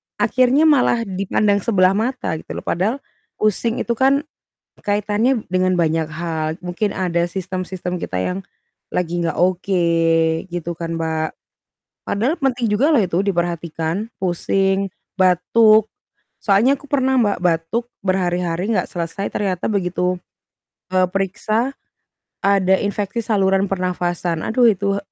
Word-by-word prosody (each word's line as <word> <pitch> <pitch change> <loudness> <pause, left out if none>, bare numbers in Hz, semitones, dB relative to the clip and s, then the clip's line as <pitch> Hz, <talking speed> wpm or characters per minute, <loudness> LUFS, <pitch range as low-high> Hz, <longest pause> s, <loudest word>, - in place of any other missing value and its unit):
akhirnya 255 +4 +3
malah 260 -6 +4
dipandang 200 +1 +1
sebelah 185 -3 +3
mata 215 -6 -1
gitu - - -8
loh, - - -6
padahal 195 +8 0 0.4
pusing 215 +2 0
itu - - -3
kan 275 +2 +3 0.6
kaitannya 210 +4 +1
dengan 185 0 +2
banyak 165 -2 +1
hal. 160 0 -3 0.2
Mungkin 180 +3 -2
ada 175 -2 0
sistem-sistem 185 0 -4
kita 95 - -4
yang 180 - -2 0.5
lagi 175 -1 -1
nggak 165 - -1
oke, 185 +1 +1 0.7
gitu 175 -1 -3
kan, 165 -1 -4
Mbak. 160 -1 -1 0.8
Padahal 235 +10 +1
penting 255 -3 0
juga 255 +8 +3
loh 300 -7 +4
itu 180 -3 0
diperhatikan, 175 0 -2
pusing, 195 +2 0 0.3
batuk, 215 +4 +4 0.5
soalnya 230 +7 +3
aku 290 - -15
pernah 265 -2 +1
Mbak, 205 -4 +2
batuk 175 +7 0 0.2
berhari-hari 180 0 0
nggak 225 - +1
selesai 170 +3 -4
ternyata 190 -3 -1
begitu, 180 -3 0 0.8
eee, 185 0 +4
periksa, 215 +7 -1 0.7
ada 195 -1 +3
infeksi 205 +2 -2
saluran 195 -3 +1
pernafasan. 175 -3 -1
Aduh 240 +6 +2
itu 200 +1 -1
190 Hz, 125 wpm, -20 LUFS, 175-215 Hz, 0.8 s, malah